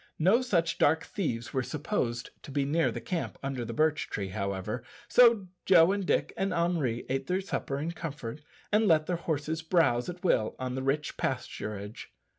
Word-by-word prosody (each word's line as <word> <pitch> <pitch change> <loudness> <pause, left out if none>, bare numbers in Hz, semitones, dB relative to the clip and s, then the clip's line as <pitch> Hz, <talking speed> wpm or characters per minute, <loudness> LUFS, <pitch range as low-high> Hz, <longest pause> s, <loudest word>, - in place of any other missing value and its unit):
No 190 +10 +4
such 170 -10 0
dark 160 +2 +4
thieves 120 - -3
were 130 - +1
supposed 130 - -2
to - - -11
be 140 0 0
near 160 +4 +2
the - - -4
camp 175 -3 -3
under 135 -3 -2
the 115 - -5
birch 155 +5 +1
tree, 100 -2 -3
however, 100 +3 -3 0.2
so 235 -5 +6 0.2
Joe, 175 -1 +6
and 200 0 -1
Dick, - - +1
and 195 +1 -1
Henri 165 -9 0
ate 135 +1 -2
their 185 +1 +1
supper 185 -7 -3
in 155 +4 -2
comfort, 150 -5 -6 0.3
and 215 +1 +4
let 155 -3 +4
their 180 - 0
horses 160 -1 -2
browse 160 -7 +2
at 180 +1 -8
will 110 - +2
on 130 -1 -3
the 130 - -2
rich 140 +3 -1
pasturage. 105 +1 -4
155 Hz, 185 wpm, -29 LUFS, 125-175 Hz, 0.3 s, so